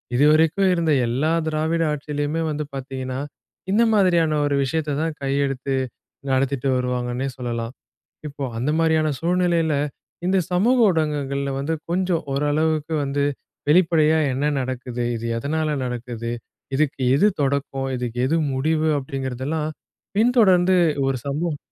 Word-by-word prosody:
இதுவரைக்கும் 160 +7 +4
இருந்த 165 -2 +1 0.2
எல்லா 135 +7 0 0.2
திராவிட 160 +2 0
ஆட்சியிலயுமே 150 +2 -2
வந்து 150 0 -2
பாத்தீங்கன்னா, 130 -1 -5 0.5
இந்த 225 +3 +4
மாதிரியான 170 -6 +3
ஒரு 145 -1 +1
விஷயத்த 150 +1 -1
தான் 160 0 -1
கையிலெடுத்து 135 -1 -1 0.6
நடத்திட்டு 135 0 +1
வருவாங்கன்னே 125 +1 -2
சொல்லலாம். 120 -1 -4 0.6
இப்போ 145 0 -8 0.2
அந்த 135 +5 0
மாரியான 160 -1 +3
சூழ்நிலையில, 170 -2 +1 0.5
இந்த 190 +1 +3
சமூக 235 +8 +3
ஊடகங்கள்ல 145 -4 -1
வந்து 160 +4 -1 0.2
கொஞ்சம் 180 -2 0
ஓரளவுக்கு 155 +2 0
வந்து 140 +1 0 0.5
வெளிப்படையா, 160 -2 +4
"என்ன 140 +3 0
நடக்குது? 125 -1 -3
இது 115 +1 -5
எதனால 155 +5 -1 0.2
நடக்குது? 120 -1 -4 0.4
இதுக்கு 145 -2 0 0.2
எது 205 +9 +5
தொடக்கம்? 135 -1 -1
இதுக்கு 120 -1 -4
எது 165 +3 +2 0.2
முடிவு?" 155 +3 +1
அப்டீங்கறதெல்லாம் 135 +3 -3 0.5
பின்தொடர்ந்து 195 -6 +4 0.3
ஒரு 135 - +1
சம்பவம் 150 +2 -2
150 Hz, 120 wpm, -22 LUFS, 135-160 Hz, 0.6 s, எது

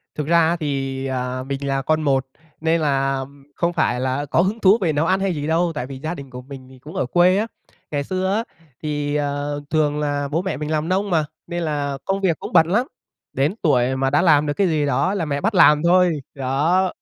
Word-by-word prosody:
Thực 150 -2 -3
ra 170 0 +4
thì, 135 -3 -2
à, 130 -1 -3
mình 140 +1 -4
là 135 0 0
con 155 +3 +1
một 135 -3 +1 0.4
nên 160 0 +1
là 135 -2 0 0.3
không 170 0 0
phải 155 -6 +1
là 130 +3 -1
có 145 - +2
hứng 200 +5 -1
thú 195 +2 +5
về 160 -4 +1
nấu 150 +3 +1
ăn 190 +2 +2
hay 195 -1 0
gì 145 0 -3
đâu 165 +2 +1
tại 125 -4 -3
vì 135 - -7
gia 155 +4 -3
đình 140 -1 -9
của 125 0 -8
mình 130 0 -11
thì 130 -1 -16
cũng 150 +5 -11
ở - - 0
quê 175 +7 +4
á. 220 - 0 0.4
Ngày 145 -1 -1
xưa 185 +3 -1
á 225 - 0 0.4
thì, 145 -1 -2
ờ, 145 0 -2
thường 150 -2 +1
là 145 -1 -1
bố 155 +4 -1
mẹ 190 +1 -3
mình 150 +1 -4
làm 155 +2 -1
nông 195 +2 0
mà 160 -3 +2 0.2
nên 175 0 -3
là 145 -3 -2
công 195 +1 -1
việc 170 -5 +1
cũng - - -7
bận 160 - +6
lắm, 235 - +1 0.5
đến 140 +8 0
tuổi 130 -6 +2
mà 135 0 +1
đã 145 - +3
làm 150 -4 +4
được 145 - -1
cái 195 +4 +1
gì 155 -3 +1
đó 175 +6 +1
là 190 -5 -1
mẹ 140 -1 -2
bắt 220 +2 0
làm 150 -4 +6
thôi. 175 -3 +3
Đó, 150 +8 +1
150 Hz, 240 wpm, -21 LUFS, 140-175 Hz, 0.5 s, bận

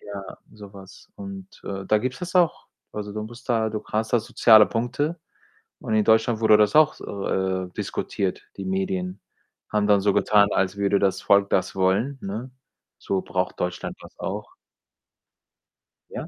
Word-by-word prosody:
Ja, 100 -2 -9
so 105 -2 -12
was 95 -1 -14
und, 195 -2 -8 0.2
äh, 95 -1 -5
da 110 - +3
gibt's 125 +2 -3
das 180 0 -6
auch. 175 -3 +2 0.3
Also, 105 -1 -5
du 105 +1 -4
musst 120 +4 -11
da 110 -2 +2
du 105 0 -5
hast 110 0 -2
da 120 - +5
soziale 110 -1 +6
Punkte 145 +8 -2 0.6
und 110 - -2
in 110 - +3
Deutschland 110 +1 +3
wurde 110 -1 +6
das 105 +2 +3
auch 155 0 +6
so, 100 -1 -7
äh, 95 -1 -1
diskutiert, 95 -2 -3
die - - -5
Medien. 190 -1 -2 0.5
Haben 105 -1 +1
dann 100 -1 +4
so 100 0 +2
getan, 100 0 +4
als 95 0 0
würde 100 0 +2
das 100 -1 +1
Volk 100 0 +3
das 95 - 0
wollen, 100 +9 +1
ne? 110 +6 -6 0.5
So 95 -1 -1
braucht 90 0 -3
Deutschland 90 0 -3
das - - -13
auch. - - -5 1.6
Ja. - - -6
105 Hz, 170 wpm, -24 LUFS, 100-125 Hz, 1.6 s, soziale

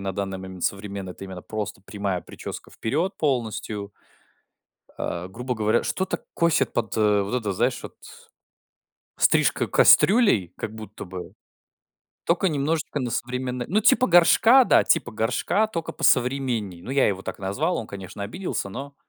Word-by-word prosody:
на 100 -1 -3
данный 95 0 -3
момент 95 -1 -7
современной- 100 -2 -3
это 95 - -10
именно 95 -2 -8
просто 105 -3 -5
прямая 100 -2 -3
прическа - - -9
вперед 160 - -2
полностью. 110 -7 -2 1.0
А, 85 +1 -4
грубо 125 +5 -4
говоря, 110 +1 +1
что-то 190 0 -2
косит 170 -1 +2
под, 115 -2 -2
э, 105 -2 +3
вот 100 +4 -4
это, 105 -5 -1
знаешь, - - 0
вот - - -9 1.2
стрижка - - +3
кастрюлей 195 - +5
как 110 - -5
будто 110 -2 -9
бы. 90 -1 -8 0.9
Тока 180 +3 +2
немножечко 150 0 -1
на 125 -2 -2
современное 125 +1 -3
ну, 205 +6 +2
типа 255 +3 +4
горшка, 225 +9 +6
да, - - +5
типа 125 - +1
горшка, 125 - +1
тока 165 -7 -5
посовременнее. 125 -8 +1
Ну, 125 - -7
я 135 0 +3
его 95 -2 -1
так - - -6
назвал, 130 - -1
он, 110 - -4
конечно, 100 0 -8
обиделся, 115 - -4
но, 140 +6 -7
110 Hz, 150 wpm, -24 LUFS, 100-145 Hz, 1.2 s, горшка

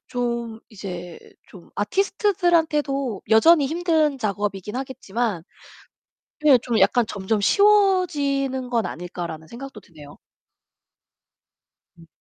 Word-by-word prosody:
좀 235 -2 -3
이제 180 -5 -8 0.3
좀 180 -4 -15
아티스트들한테도 320 - 0
여전히 290 +7 +6
힘든 315 -3 +1
작업이긴 205 -1 -3
하겠지만 235 -7 -3 1.0
네, 285 -4 +7
좀 235 -3 0
약간 245 -2 +3
'점점 205 +2 -2
쉬워지는 295 - +2
건 230 -2 +1
아닐까.'라는 170 -2 -7
생각도 245 - -10
드네요. 150 -4 -15 1.8
음. 165 - -16
245 Hz, 235 characters per minute, -22 LUFS, 200-300 Hz, 1.8 s, 네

